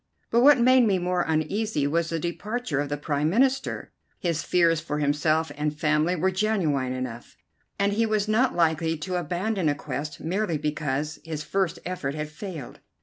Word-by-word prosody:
But 235 - +4
what 285 +2 +8
made 250 0 +5
me 195 -2 +3
more 180 0 0
uneasy 160 +2 0
was 165 +3 0
the 165 - -1
departure 175 - -3
of 145 -1 -2
the 145 - -2
Prime 145 0 0
Minister. 265 +7 +1 0.3
His 170 -4 -1
fears 170 -2 +3
for 150 -2 -3
himself 150 +2 +1
and 150 0 -2
family 155 +3 +2
were 185 +3 +1
genuine 180 -10 0
enough, 130 -2 -6 0.4
and 200 0 +1
he 225 +2 +2
was 215 -1 0
not 245 +4 +2
likely 165 -1 +1
to 180 +4 -3
abandon 180 +1 -1
a 145 - +1
quest 145 +1 -5
merely 175 0 -1
because 150 0 -2
his 155 -2 -5
first 190 +1 -1
effort 155 -6 -3
had 150 0 -4
failed. 155 - -8
165 Hz, 175 wpm, -26 LUFS, 150-200 Hz, 0.4 s, what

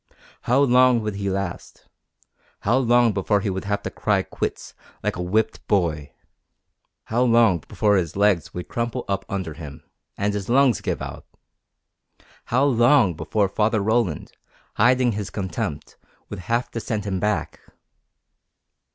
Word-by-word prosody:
How 125 +3 +4
long 125 -2 +4
would 105 -1 -3
he 100 -1 -2
last? 95 -2 -5 0.8
How 115 +6 +2
long 120 -2 +3
before 100 +1 +1
he 100 - -1
would 95 +1 -4
have 100 0 -2
to - - -4
cry 100 -3 0
quits, - - -5 0.3
like - - -1
a 90 - -4
whipped 110 +5 -1
boy? 80 -8 0 0.9
How 115 +2 -1
long 115 -7 +4
before 105 -2 +2
his 85 -4 -2
legs 100 -4 +2
would 90 - -7
crumple 120 +1 -3
up 95 -1 -2
under 95 -5 -3
him, 75 -3 -10 0.3
and 100 +1 0
his 100 0 -4
lungs 130 -2 +3
give - - -3
out? - - -8 1.2
How 125 +3 +1
long 120 -5 +4
before 85 +6 0
Father 110 +3 +1
Roland, 105 - 0 0.4
hiding 125 +2 +3
his 100 -2 -4
contempt, 90 -6 -5 0.3
would 105 - -5
have 115 +7 -2
to 115 - -4
send 110 -2 -3
him 95 -2 -2
back? 105 -6 -2
105 Hz, 150 wpm, -23 LUFS, 95-120 Hz, 1.2 s, How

